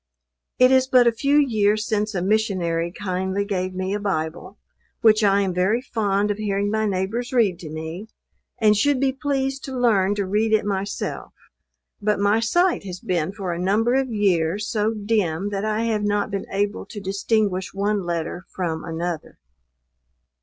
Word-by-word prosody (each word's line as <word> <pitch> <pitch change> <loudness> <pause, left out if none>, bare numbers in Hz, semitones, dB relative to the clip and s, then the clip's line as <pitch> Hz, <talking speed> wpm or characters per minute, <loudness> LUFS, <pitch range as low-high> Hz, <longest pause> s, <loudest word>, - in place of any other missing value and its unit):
It 255 +1 +6
is 260 0 +4
but 255 -2 +5
a 235 - +5
few 275 +5 +1
years 215 -6 +2
since 215 0 -1
a 180 - -1
Missionary 185 -5 0
kindly 190 +1 -2
gave 185 -2 -2
me 185 +1 -2
a 205 - -1
Bible, 185 0 -3 0.4
which 215 -1 +5
I 200 0 +4
am 190 -2 -1
very 190 +6 +2
fond 210 -5 0
of 205 - -3
hearing 205 -1 -1
my 220 0 +1
neighbors 200 +6 -2
read 215 -9 +2
to 160 - -8
me, 160 +6 -6 0.5
and 215 -1 +4
should 275 +6 +2
be 270 0 +2
pleased 270 0 -2
to 265 -1 -5
learn 205 -5 +3
to 200 -1 -1
read 215 +3 +1
it 215 - +3
myself; 200 0 -3 0.7
but 210 -1 +1
my 205 +2 +3
sight 350 - +2
has 185 -2 -7
been 175 -1 -1
for 195 -4 -4
a 170 - -5
number 210 +6 +2
of 265 0 +1
years, 200 -2 +1
so 215 0 0
dim 205 -4 0
that 200 +1 -2
I 215 +1 0
have 220 -2 0
not 205 0 0
been 200 -1 -3
able 205 +1 -2
to 210 - -7
distinguish 195 -1 0
one 205 +1 0
letter 175 +1 -3
from 165 -4 -2
another. 165 0 -4
205 Hz, 175 wpm, -23 LUFS, 185-220 Hz, 0.7 s, It